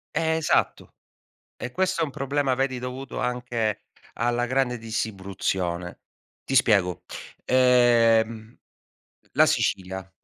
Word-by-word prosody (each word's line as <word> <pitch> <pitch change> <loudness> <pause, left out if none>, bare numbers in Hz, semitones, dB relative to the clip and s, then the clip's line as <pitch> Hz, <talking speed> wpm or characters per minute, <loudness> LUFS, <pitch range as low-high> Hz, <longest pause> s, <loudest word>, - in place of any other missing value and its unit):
Eh, 160 0 +1
esatto. 160 - 0 0.6
E 125 - -6
questo 185 +3 0
è - - +3
un 155 - -2
problema, 140 0 -1
vedi, 130 -1 -1
dovuto 125 +2 -6
anche 120 -3 -2 0.3
alla 120 +1 0
grande 125 0 0
distribuzione. 95 -5 -3 0.4
Ti 135 - -3
spiego, 100 -8 +3 0.4
ehm, 115 -3 +3 0.8
la - - +5
Sicilia 95 0 -1
120 Hz, 105 wpm, -25 LUFS, 110-130 Hz, 0.8 s, la